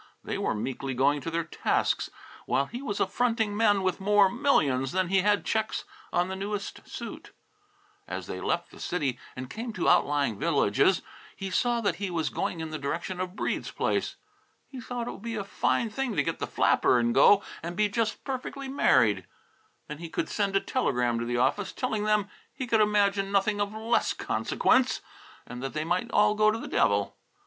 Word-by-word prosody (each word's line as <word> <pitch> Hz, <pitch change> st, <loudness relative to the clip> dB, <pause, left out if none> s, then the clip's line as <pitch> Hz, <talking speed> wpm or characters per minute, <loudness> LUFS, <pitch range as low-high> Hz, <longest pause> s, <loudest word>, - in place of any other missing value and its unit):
They -, -, -3 dB
were -, -, 0 dB
meekly 130 Hz, +4 st, -3 dB
going 140 Hz, +3 st, +2 dB
to 150 Hz, -, -4 dB
their 165 Hz, 0 st, -1 dB
tasks 160 Hz, -, 0 dB, 0.4 s
while 140 Hz, -, +2 dB
he 240 Hz, -, -7 dB
was 205 Hz, -8 st, -3 dB
affronting 225 Hz, -4 st, +1 dB
men 205 Hz, -3 st, +3 dB
with 185 Hz, 0 st, 0 dB
more 200 Hz, 0 st, +4 dB
millions 145 Hz, -, +2 dB
than 185 Hz, -1 st, +1 dB
he 195 Hz, 0 st, +4 dB
had 205 Hz, +1 st, +2 dB
checks 220 Hz, 0 st, -1 dB, 0.3 s
on 175 Hz, +1 st, +1 dB
the 190 Hz, -, -4 dB
newest 200 Hz, +1 st, -5 dB
suit. -, -, -8 dB, 0.7 s
As -, -, -5 dB
they -, -, -6 dB
left -, -, -1 dB
the -, -, -14 dB
city 140 Hz, -8 st, -2 dB, 0.2 s
and 130 Hz, 0 st, -6 dB
came 225 Hz, -, -5 dB
to 185 Hz, -, -1 dB
outlying 140 Hz, -8 st, +3 dB
villages, 165 Hz, -, +2 dB, 0.3 s
he 195 Hz, -1 st, -5 dB
saw 240 Hz, +4 st, +1 dB
that 205 Hz, -, 0 dB
he 200 Hz, -1 st, -3 dB
was 165 Hz, -3 st, -1 dB
going 165 Hz, -, -2 dB
in 160 Hz, -1 st, -5 dB
the 155 Hz, -, -4 dB
direction 160 Hz, +6 st, -3 dB
of 185 Hz, 0 st, -4 dB
Breede's -, -, -2 dB
place. -, -, -1 dB, 0.5 s
He 260 Hz, -2 st, -9 dB
thought 240 Hz, 0 st, -4 dB
it -, -, -3 dB
would -, -, -10 dB
be 230 Hz, 0 st, -4 dB
a 205 Hz, -, -2 dB
fine 220 Hz, +3 st, 0 dB
thing 250 Hz, -1 st, -2 dB
to -, -, +2 dB
get -, -, -3 dB
the -, -, -2 dB
flapper -, -, +3 dB
and 120 Hz, 0 st, +2 dB
go 200 Hz, -, +6 dB, 0.2 s
and 170 Hz, +2 st, -5 dB
be 210 Hz, 0 st, +3 dB
just 220 Hz, +1 st, -1 dB
perfectly 270 Hz, +1 st, -5 dB
married. 130 Hz, -, +3 dB, 0.6 s
Then 150 Hz, 0 st, -7 dB
he 165 Hz, -1 st, -7 dB
could -, -, -2 dB
send 200 Hz, -2 st, 0 dB
a -, -, +5 dB
telegram 125 Hz, -, 0 dB
to 115 Hz, -, -2 dB
the 120 Hz, 0 st, -1 dB
office, 135 Hz, +11 st, +1 dB
telling 220 Hz, -5 st, -2 dB
them 210 Hz, -1 st, +2 dB, 0.2 s
he 260 Hz, -, -5 dB
could 225 Hz, -2 st, +3 dB
imagine 200 Hz, -2 st, +2 dB
nothing 205 Hz, +1 st, +2 dB
of 205 Hz, 0 st, -1 dB
less 225 Hz, +2 st, +1 dB
consequence, 255 Hz, 0 st, +1 dB, 0.4 s
and 125 Hz, 0 st, -8 dB
that 135 Hz, 0 st, -4 dB
they 155 Hz, -, -1 dB
might 180 Hz, +7 st, 0 dB
all 210 Hz, -2 st, +4 dB
go 215 Hz, 0 st, +4 dB
to 215 Hz, -, 0 dB
the -, -, -7 dB
devil. 100 Hz, -1 st, +1 dB
195 Hz, 200 wpm, -28 LUFS, 150-220 Hz, 0.7 s, go